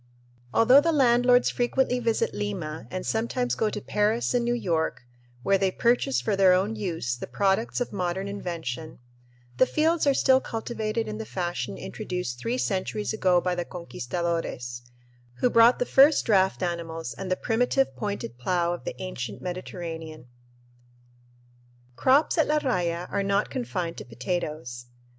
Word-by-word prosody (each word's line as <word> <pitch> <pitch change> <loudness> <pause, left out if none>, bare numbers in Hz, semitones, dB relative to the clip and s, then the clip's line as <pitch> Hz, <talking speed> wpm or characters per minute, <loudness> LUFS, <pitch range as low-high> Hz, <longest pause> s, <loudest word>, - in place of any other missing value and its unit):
Although 250 - +6
the 330 +2 +1
landlords 245 -3 +4
frequently 250 +1 +1
visit 230 -2 0
Lima 175 -7 -4
and 185 0 -5
sometimes 245 +2 -1
go 220 - +1
to 210 - -4
Paris 210 +4 0
and 245 -1 +2
New 240 0 +1
York, 160 - -1 0.4
where 195 +6 +3
they 195 0 +2
purchase 185 - +1
for 125 +10 0
their 190 -2 +5
own 195 +4 +1
use 165 - -2
the 125 - -7
products 200 +5 0
of 245 - -3
modern 185 0 -2
invention, 165 -7 -5 0.6
the 255 - +5
fields 320 0 +1
are 275 - +4
still 260 0 +4
cultivated 225 -1 -3
in 215 0 -5
the - - -3
fashion 175 - -3
introduced 120 - -5
three 235 - -2
centuries 205 -1 -2
ago 185 -4 +3
by 180 +1 -1
the 175 0 -2
conquistadores, 165 -7 -4 0.5
who 245 - +1
brought 230 +2 +6
the 245 - 0
first 280 +4 +5
draft 190 -3 +2
animals 165 -5 -3
and 185 +10 -6
the 185 - +2
primitive 245 +3 +1
pointed 200 - -4
plough 175 +5 0
of 175 - -8
the - - -5
ancient 125 - -5
Mediterranean. 165 -4 -6 1.7
Crops 280 - +3
at 315 - +4
La 300 - +2
Raya 180 - -1
are 200 - 0
not 200 +1 0
confined 185 -10 -3
to - - -7
potatoes. 125 -1 -4
190 Hz, 155 wpm, -26 LUFS, 170-235 Hz, 1.7 s, Although